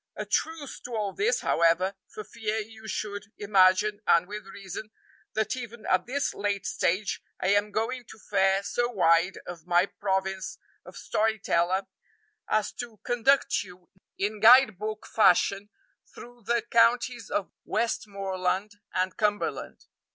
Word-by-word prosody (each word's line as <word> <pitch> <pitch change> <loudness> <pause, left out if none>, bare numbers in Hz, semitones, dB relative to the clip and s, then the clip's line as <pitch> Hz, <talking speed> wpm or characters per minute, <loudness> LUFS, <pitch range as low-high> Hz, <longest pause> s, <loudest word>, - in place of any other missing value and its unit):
A - - -4
truce 320 -4 -2
to 245 -1 -7
all 205 -3 -2
this, 455 +4 +1
however, 170 +3 +2 0.2
for 215 - -7
fear 215 +1 -3
you 220 0 -7
should 205 -1 -4
imagine, 205 +1 +3
and 170 - +5
with 210 +1 -8
reason, 195 +2 -8 0.4
that 220 +1 0
even 235 -3 -8
at 185 - +1
this 280 +3 -1
late 200 -1 -2
stage 190 +2 0 0.2
I 185 - 0
am 205 +1 +3
going 240 +4 -2
to - - -13
fare 195 -2 +1
so 240 +4 -1
wide 180 -4 +3
of 175 -1 -9
my 175 +1 +4
province 190 -1 -3 0.3
of - - -12
story 220 +1 0
teller 185 0 +1 0.6
as 215 -1 +1
to 235 -3 -6
conduct 245 +3 +2
you 180 0 -13 0.3
in 205 +2 -2
guide 230 -2 +7
book 215 0 -5
fashion 205 -2 +3 0.5
through 240 -2 -13
the 235 -1 +1
counties 235 +1 +2
of 200 - -2
Westmoreland 195 -3 -2 0.2
and 185 0 0
Cumberland. 205 -1 -2
210 Hz, 145 wpm, -27 LUFS, 190-225 Hz, 0.6 s, guide